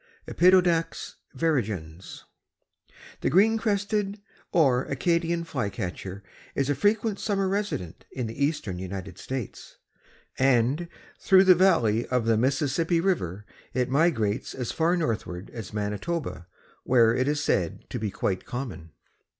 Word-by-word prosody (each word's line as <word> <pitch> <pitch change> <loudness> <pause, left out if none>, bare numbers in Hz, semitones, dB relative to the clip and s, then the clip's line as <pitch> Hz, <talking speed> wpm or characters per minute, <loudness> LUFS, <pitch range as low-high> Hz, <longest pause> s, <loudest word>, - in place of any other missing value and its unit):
(Empidonax 175 -2 +3 0.2
virescens.) 100 - -2 1.0
The - - 0
Green 220 +6 +4
crested 205 -1 -1 0.3
or 135 -7 +3
Acadian 170 +3 0
Flycatcher 100 - -4 0.3
is 140 +1 +1
a - - +3
frequent 205 - +1
summer 195 -2 0
resident 195 - -3
in 125 -2 -3
the 115 +5 -3
eastern 140 - -1
United 95 0 -6
States, 130 -5 -6 0.6
and 135 +5 +2 0.3
through 190 -1 +6
the 190 -1 +8
valley 140 - +3
of 125 -3 0
the 115 0 +3
Mississippi 145 +7 +1
river 105 - -1 0.3
it 125 0 0
migrates 135 -7 +1
as 125 -3 -3
far 170 +2 +1
northward 110 - -3
as 110 -5 -7
Manitoba, 105 - -3 0.4
where 115 -3 +4
it 130 +2 0
is 145 0 +1
said 90 - -1
to 125 - -3
be 110 -1 -2
quite 95 -2 -2
common. 120 - -6
135 Hz, 125 wpm, -26 LUFS, 105-170 Hz, 1.0 s, the